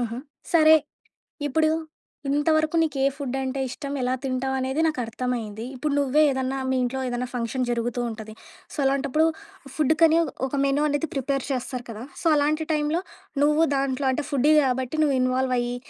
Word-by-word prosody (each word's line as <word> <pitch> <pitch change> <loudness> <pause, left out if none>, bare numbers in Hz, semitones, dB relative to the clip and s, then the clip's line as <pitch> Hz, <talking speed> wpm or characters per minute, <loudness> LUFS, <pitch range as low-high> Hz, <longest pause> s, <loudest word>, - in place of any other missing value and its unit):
ఆహా! 235 -1 -2 0.4
సరే. 315 -2 +7 0.8
ఇప్పుడు 315 +3 +2 0.6
ఇంతవరకు 310 +3 +2
నీకే 300 -4 0
ఫుడ్ 275 -3 -4
అంటే 265 +1 -3
ఇష్టం, 280 +2 -6
ఎలా 250 0 0
తింటావనేది 265 +2 -1
నాకర్థమైంది. 235 -5 -3
ఇప్పుడు 290 +3 -2
నువ్వే 285 +2 +3
ఏదన్నా 265 0 -1
మీ 260 - +1
ఇంట్లో 255 +2 -2
ఏదేనా 245 0 -2
ఫంక్షన్ 245 +1 -1
జరుగుతూ 240 +1 -1
ఉంటది. 220 -1 -8 0.4
సో, - - -9
అలాంటప్పుడు 275 +3 +2 0.5
ఫుడ్‌కని 315 +2 +4
ఒ - - -1 0.2
ఒక 270 - -4
మెనూ 275 +1 +2
అనేది 290 +2 0
ప్రిపేర్ 275 0 -1
చేస్తారు 250 -1 -3
కదా! 225 0 -7 0.2
సో, - - -11
అలాంటి 305 +2 +1
టైంలో, 300 +3 0 0.4
నువ్వు 300 +2 +4
దాంట్లో 270 0 0
అంటే 290 +3 -1
ఫుడ్డీ 290 +1 +3
కాబట్టి, 260 +1 -1
నువ్వు 285 -3 +2
ఇన్‌వాల్వ్ 255 0 +1
అయి, 240 0 -2
270 Hz, 155 wpm, -25 LUFS, 250-295 Hz, 0.8 s, సరే